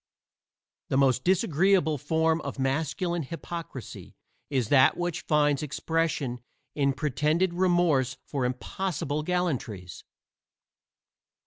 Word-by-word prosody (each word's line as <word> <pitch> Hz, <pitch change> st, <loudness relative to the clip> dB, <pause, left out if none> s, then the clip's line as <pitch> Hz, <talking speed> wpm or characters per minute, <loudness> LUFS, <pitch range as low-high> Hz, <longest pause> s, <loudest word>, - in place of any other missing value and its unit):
The 135 Hz, -, +1 dB
most 130 Hz, -2 st, +3 dB
disagreeable 175 Hz, -3 st, +2 dB
form 160 Hz, +3 st, +1 dB
of -, -, -6 dB
masculine 160 Hz, +6 st, -1 dB
hypocrisy 165 Hz, -2 st, -7 dB, 0.3 s
is 130 Hz, -6 st, 0 dB
that 135 Hz, -2 st, +5 dB
which 175 Hz, -2 st, -2 dB
finds 145 Hz, -2 st, +3 dB
expression 150 Hz, -4 st, -1 dB, 0.3 s
in 140 Hz, -2 st, +1 dB
pretended 155 Hz, +5 st, 0 dB
remorse 175 Hz, -8 st, +2 dB
for 140 Hz, -3 st, -3 dB
impossible 145 Hz, +4 st, -2 dB
gallantries. 140 Hz, -, -3 dB
150 Hz, 95 wpm, -27 LUFS, 135-170 Hz, 0.3 s, that